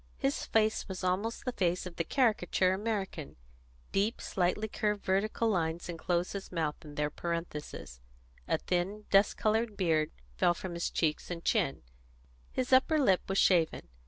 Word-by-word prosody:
His 275 Hz, 0 st, -1 dB
face 220 Hz, -1 st, +2 dB
was 190 Hz, -1 st, -6 dB
almost 195 Hz, +6 st, -1 dB
the 250 Hz, -, 0 dB
face 180 Hz, -5 st, 0 dB
of 180 Hz, -2 st, -7 dB
the 165 Hz, -, +1 dB
caricature 190 Hz, -, +2 dB
American: 195 Hz, -6 st, -3 dB, 0.6 s
deep, 205 Hz, +4 st, +1 dB
slightly 190 Hz, +4 st, 0 dB
curved 210 Hz, -1 st, -1 dB
vertical 205 Hz, +4 st, +1 dB
lines 170 Hz, -4 st, -1 dB
enclosed 175 Hz, +1 st, -1 dB
his 200 Hz, -1 st, -6 dB
mouth 160 Hz, -4 st, 0 dB
in 150 Hz, -2 st, -10 dB
their 150 Hz, 0 st, 0 dB
parenthesis; 150 Hz, -, -5 dB, 0.5 s
a -, -, +2 dB
thin, 190 Hz, +4 st, -2 dB
dust 195 Hz, +1 st, +5 dB
coloured 220 Hz, 0 st, +1 dB
beard 160 Hz, -5 st, +2 dB, 0.3 s
fell 175 Hz, -, +3 dB
from 180 Hz, 0 st, -6 dB
his 170 Hz, 0 st, -1 dB
cheeks 155 Hz, -2 st, -1 dB
and 170 Hz, -1 st, -5 dB
chin; 185 Hz, -, +1 dB, 0.7 s
his 260 Hz, 0 st, -1 dB
upper 275 Hz, +5 st, +5 dB
lip 195 Hz, -11 st, +4 dB
was 195 Hz, -, 0 dB
shaven. 165 Hz, -, +3 dB
185 Hz, 160 wpm, -31 LUFS, 170-215 Hz, 0.7 s, dust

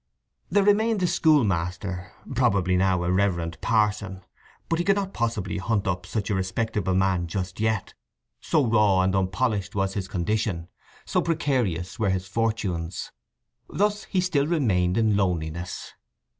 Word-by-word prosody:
There 205 Hz, -, +3 dB
remained 215 Hz, +2 st, +3 dB
the 185 Hz, -, +1 dB
schoolmaster—probably 95 Hz, -, +1 dB
now 90 Hz, -1 st, +2 dB
a 90 Hz, -, 0 dB
reverend 85 Hz, -4 st, 0 dB
parson. 105 Hz, -3 st, 0 dB, 0.4 s
But 165 Hz, -, 0 dB
he 175 Hz, -, 0 dB
could 195 Hz, -, +4 dB
not 195 Hz, -1 st, -2 dB
possibly 110 Hz, -6 st, -2 dB
hunt 105 Hz, 0 st, 0 dB
up 90 Hz, -1 st, -2 dB
such 105 Hz, 0 st, -2 dB
a -, -, +2 dB
respectable 95 Hz, 0 st, -1 dB
man 95 Hz, -2 st, +1 dB
just 90 Hz, +2 st, -4 dB
yet; 110 Hz, -1 st, -1 dB, 0.5 s
so 150 Hz, -4 st, +1 dB
raw 105 Hz, -5 st, +4 dB
and 95 Hz, 0 st, +1 dB
unpolished 100 Hz, +1 st, 0 dB
was 95 Hz, -1 st, 0 dB
his 95 Hz, -2 st, -3 dB
condition, 90 Hz, -2 st, -2 dB, 0.4 s
so -, -, +1 dB
precarious 120 Hz, -, -1 dB
were 105 Hz, -3 st, +2 dB
his 95 Hz, 0 st, -1 dB
fortunes. 95 Hz, -5 st, -2 dB, 0.6 s
Thus 210 Hz, +1 st, 0 dB
he 185 Hz, -, 0 dB
still 150 Hz, -6 st, +1 dB
remained 100 Hz, -, +1 dB
in 110 Hz, -2 st, +3 dB
loneliness. 85 Hz, -3 st, -2 dB
100 Hz, 145 wpm, -25 LUFS, 90-115 Hz, 0.6 s, could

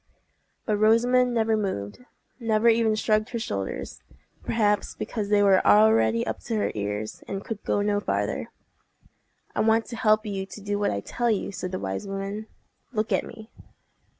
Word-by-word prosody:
But 210 Hz, -2 st, +1 dB
Rosamond 245 Hz, +4 st, +4 dB
never 225 Hz, -1 st, +2 dB
moved—never 215 Hz, -, -3 dB
even 225 Hz, -1 st, +3 dB
shrugged 215 Hz, +1 st, +1 dB
her 240 Hz, -, -3 dB
shoulders—perhaps 100 Hz, -, -3 dB
because 210 Hz, -3 st, -4 dB
they 205 Hz, -1 st, +4 dB
were 195 Hz, -2 st, +5 dB
already 110 Hz, +2 st, +4 dB
up -, -, -3 dB
to 230 Hz, -, -2 dB
her 210 Hz, -, 0 dB
ears, 105 Hz, +1 st, -4 dB
and 195 Hz, 0 st, -5 dB
could 220 Hz, -3 st, -6 dB
go 205 Hz, -, 0 dB
no 205 Hz, 0 st, +1 dB
farther. -, -, -2 dB, 1.1 s
"I -, -, -1 dB
want 225 Hz, +1 st, +3 dB
to 240 Hz, -, -7 dB
help 215 Hz, -1 st, +3 dB
you 195 Hz, -2 st, -3 dB
to 210 Hz, -, -10 dB
do 205 Hz, 0 st, -2 dB
what 205 Hz, -, +1 dB
I 100 Hz, -, -2 dB
tell 240 Hz, -, -1 dB
you," 210 Hz, -3 st, 0 dB
said 185 Hz, -1 st, -5 dB
the 185 Hz, -, -2 dB
wise 95 Hz, -, -4 dB
woman. 195 Hz, +2 st, -4 dB, 0.4 s
"Look 215 Hz, -3 st, -2 dB
at -, -, +2 dB
me." 220 Hz, +1 st, -12 dB
210 Hz, 165 wpm, -26 LUFS, 190-225 Hz, 1.1 s, were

